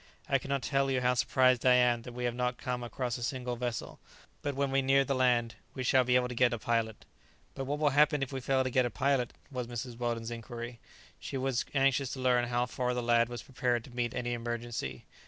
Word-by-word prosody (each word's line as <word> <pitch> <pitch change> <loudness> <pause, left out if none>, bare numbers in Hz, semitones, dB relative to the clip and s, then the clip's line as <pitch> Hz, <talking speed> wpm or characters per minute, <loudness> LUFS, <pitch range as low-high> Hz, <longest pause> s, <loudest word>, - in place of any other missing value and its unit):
I 135 - +2
cannot 135 0 -2
tell 135 +1 +1
you 130 -1 +1
how 125 0 +3
surprised 130 0 +3
I 125 -1 +6
am 120 -1 +3
that 125 - -9
we 125 0 -5
have 120 -1 0
not 125 0 -1
come 125 -1 -3
across 120 0 -3
a - - -5
single 125 -1 -2
vessel. 120 -1 -4 0.4
But 145 -1 -2
when 140 0 0
we 135 0 +3
near 135 +1 +4
the 140 - 0
land 120 -3 +2 0.2
we 130 - -3
shall 130 +1 +4
be 125 0 +2
able 125 0 +3
to 125 - -6
get 120 0 +3
a - - -1
pilot." 115 -1 -1 0.5
"But 135 - -4
what 145 +2 -2
will 150 -1 +2
happen 150 0 +4
if 135 - -5
we 135 - -3
fail 130 +1 +2
to 130 - -2
get 130 +1 +3
a 120 - 0
pilot?" 130 +1 +1 0.2
was 125 -3 -3
Mrs. 120 0 -6
Weldon's 120 -1 -2
inquiry. 120 0 -7 0.4
She 135 - -5
was 130 -2 0
anxious 135 -1 +2
to 130 - -6
learn 125 -1 +2
how 120 0 +1
far 125 0 -2
the 125 - -1
lad 115 0 +3
was 120 0 -6
prepared 125 -3 -1
to 120 -1 -13
meet 120 -1 -1
any 120 0 -2
emergency. 120 - -4
125 Hz, 240 wpm, -31 LUFS, 120-130 Hz, 0.5 s, I